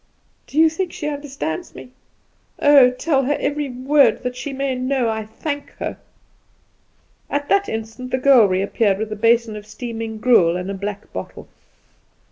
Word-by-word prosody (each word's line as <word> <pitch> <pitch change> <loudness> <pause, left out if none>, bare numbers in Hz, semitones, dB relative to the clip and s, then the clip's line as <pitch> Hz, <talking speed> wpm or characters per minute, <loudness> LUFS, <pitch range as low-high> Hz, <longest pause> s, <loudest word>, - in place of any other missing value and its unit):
"Do 290 - -9
you 320 +1 +7
think 340 +3 -2
she 300 - -5
understands 280 - -5
me? 250 - -11 0.7
Oh, 285 -3 +6
tell 270 +2 0
her 290 +2 +1
every 290 -1 -2
word, 265 +3 +2
that 250 0 -3
she 285 +3 -5
may 275 0 -2
know 255 -1 0
I 220 -1 -3
thank 285 +6 -5
her." - - -5 1.3
At 285 0 -2
that 400 0 +2
instant 225 +3 -5
the 260 - 0
girl 255 -5 +6
reappeared 195 +2 +1
with 215 +1 -4
a - - -2
basin 230 +1 +2
of 210 0 -9
steaming 225 0 -6
gruel 215 -8 +4
and 180 +2 -4
a - - -3
black 200 +1 -6
bottle. - - -7
250 Hz, 165 wpm, -20 LUFS, 220-285 Hz, 1.3 s, you